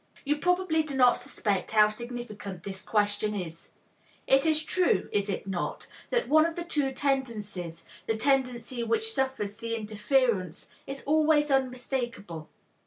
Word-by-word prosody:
You 295 +1 +1
probably 355 0 +2
do 300 -3 -4
not 250 -1 +6
suspect 210 -7 -2
how 215 -1 +6
significant 215 -5 -7
this 190 -1 -6
question 210 0 +1
is. 170 -4 -6 0.6
It 270 +3 +4
is 310 0 +3
true, 365 +3 +2
is 205 0 0
it 195 - -3
not, 190 -3 -3 0.2
that 485 -1 0
one 310 +2 +6
of 330 0 -1
the 345 - -3
two 295 -5 0
tendencies, 210 - -2 0.2
the 225 - 0
tendency 250 -1 0
which 445 - +1
suffers 260 - -1
the 230 +1 -3
interference, 215 - 0 0.2
is 275 0 -6
always 300 -1 +3
unmistakable? 250 - -2
245 Hz, 145 wpm, -28 LUFS, 205-285 Hz, 0.6 s, not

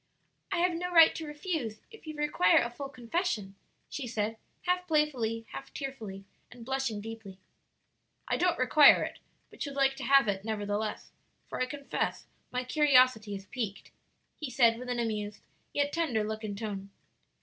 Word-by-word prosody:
"I - - +1
have 355 +1 +3
no 355 +2 -3
right 330 -2 +8
to 320 - -6
refuse, 295 - -4
if 445 -7 -14
you 310 - -5
require 295 -12 +3
a 235 - -3
full 275 +3 -6
confession," 245 - -2 0.3
she 270 -4 -5
said, 225 -1 -2 0.3
half 360 0 0
playfully, 250 -8 +1
half 270 - -8
tearfully, 220 -9 -6 0.3
and 245 -2 -11
blushing 265 -5 -1
deeply. 225 -3 -8 0.9
"I - - +1
don't 355 -1 +2
require 285 +4 +7
it, - - -6 0.3
but - - -16
should 280 -2 -3
like 270 -1 +3
to 270 - -6
have 275 -3 +5
it, 195 -1 -1
nevertheless; 210 -1 -3 0.4
for - - -4
I 255 - +1
confess 280 0 -3 0.3
my 250 0 -1
curiosity 255 -6 +4
is 195 0 -8
piqued," 215 -4 -5 0.5
he 305 - -4
said 235 -2 +4
with 250 0 -7
an 245 - -1
amused, 215 -3 -3 0.3
yet 285 0 0
tender 285 -11 +1
look 220 +1 -4
and 205 -2 -4
tone. 200 -2 -5
250 Hz, 170 wpm, -30 LUFS, 215-295 Hz, 0.9 s, right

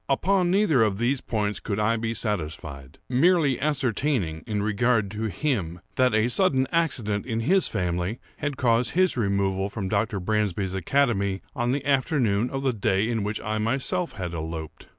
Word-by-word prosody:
Upon 180 +6 +2
neither 180 - +3
of 105 -3 +2
these 125 +4 0
points 105 -3 -2
could 105 -2 -3
I 110 +2 +2
be 115 0 -2
satisfied; 75 - -4
merely 145 0 +3
ascertaining, 130 - 0
in 105 -2 -1
regard 110 -1 +1
to 110 +1 -3
him, 95 - -2 0.2
that 125 -3 +3
a 110 +2 +3
sudden 130 -2 +2
accident 120 - 0
in 115 -2 -1
his 185 +10 +3
family 90 +5 -2 0.2
had 145 -2 -3
caused 120 -1 +2
his 185 0 +3
removal 100 -3 0
from 100 -2 -4
Dr. 105 0 0
Bransby's 100 -1 -1
academy 100 -1 0
on 120 -2 0
the 140 +1 -2
afternoon 130 -6 +1
of 135 +1 -4
the 130 -2 +1
day 100 0 +1
in 115 -2 0
which 105 +1 -2
I 110 0 -2
myself 135 +10 0
had 90 -4 -5
eloped. 80 -1 -6
110 Hz, 170 wpm, -25 LUFS, 100-135 Hz, 0.2 s, neither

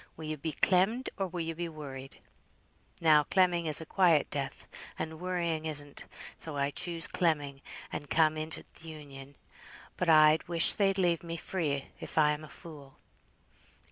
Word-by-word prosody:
Will 160 - -8
you 155 0 -4
be 155 +2 -5
clemmed, 195 - +1
or 195 - -3
will 175 -1 -6
you 165 0 -4
be 170 +1 -5
worried?' 135 -4 -10 0.8
Now 155 -2 +5
clemming 175 0 +1
is 150 - +10
a 160 - -8
quiet 170 -4 +2
death, 140 -2 -5 0.3
and 160 0 -6
worrying 170 -3 -3
isn't, 145 -2 -5 0.3
so 155 -3 -5
I 140 0 -1
choose 170 +1 -1
clemming, 145 -5 -1 0.3
and 145 - -6
come 155 -1 +2
into 155 +1 -3
th' - - -15
Union. 145 -3 -11 0.6
But 180 - -1
I 155 0 +6
wish 170 -1 +7
they'd 195 -1 +1
leave 175 -3 +1
me 170 -1 -6
free, 150 -7 -3
if - - -10
I 150 -1 +4
am 150 +1 -5
a 155 - -11
fool." 145 -5 -12
160 Hz, 170 wpm, -29 LUFS, 150-170 Hz, 0.8 s, is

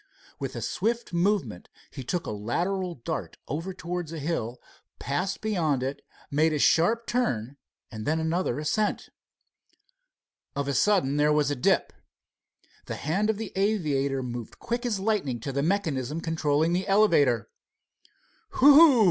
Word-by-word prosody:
With - - -4
a - - -4
swift 230 +1 -2
movement 170 - 0 0.2
he 135 - -7
took 175 +7 -2
a - - -4
lateral 175 - -2
dart 150 +5 -5
over 165 +7 -3
towards 175 -2 -5
a 165 - -5
hill, 140 -6 -3 0.4
passed 180 +8 -2
beyond 165 -11 0
it, 135 +2 -4 0.3
made 155 +2 +2
a - - 0
sharp 175 +11 +3
turn, 140 - -1 0.4
and 110 -2 -6
then 160 +2 +1
another 160 -4 -1
ascent. 155 +8 -1 1.5
Of 140 0 -2
a 140 - 0
sudden 160 -7 +2
there 150 +1 +3
was 150 -1 +2
a - - 0
dip. 125 - +1 0.9
The - - -4
hand 195 +8 -1
of 220 - +1
the 220 -2 -5
aviator 150 -10 0
moved 120 -2 -6
quick 240 +1 -3
as 210 -5 -1
lightning 190 - 0
to 135 - -4
the 140 +1 -1
mechanism 155 -5 -1
controlling 160 0 +1
the 185 +2 -1
elevator. 170 - +3 1.1
"Whew! 290 -2 +8
160 Hz, 150 wpm, -27 LUFS, 140-195 Hz, 1.5 s, Whew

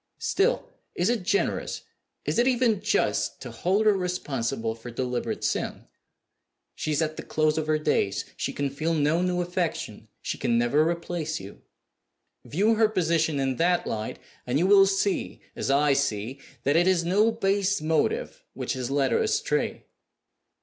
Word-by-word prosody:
Still, 465 +6 +1 0.3
is 180 +5 +1
it 240 -4 -1
generous 200 +2 -1 0.4
is - - 0
it 245 - +4
even 240 -5 +2
just - - 0
to - - -7
hold 195 +5 +1
her 215 - +6
responsible 135 - -2
for 115 +2 -10
deliberate 125 +1 -3
sin? - - -2 0.9
She 155 - -3
is 150 +2 +2
at 155 0 -3
the - - -4
close 155 -1 +1
of 155 -1 -2
her 155 0 +2
days; 100 -10 0
she - - -2
can 140 -1 -2
feel 160 +4 -1
no 155 +3 +2
new 180 0 0
affection; 175 -1 -3
she - - -4
can 120 -1 +1
never 145 +7 +3
replace 170 -2 -3
you. 95 +1 -11 0.8
View 205 +9 +2
her 220 -1 +3
position 165 -6 +1
in 135 -2 0
that 175 +1 +2
light, 110 0 -4 0.3
and 125 +2 +1
you 170 - +2
will 195 0 +7
see 195 0 -1 0.2
(as - - -3
I 140 +1 +4
see) 130 -2 -1 0.2
that 140 - +2
it 175 +2 +4
is 180 -3 +3
no 205 +6 +3
base 200 -2 +1
motive 445 - -1
which - - -3
has 130 -2 -4
led 135 -1 +1
her - - +2
astray. - - -1
165 Hz, 170 wpm, -26 LUFS, 140-195 Hz, 0.9 s, will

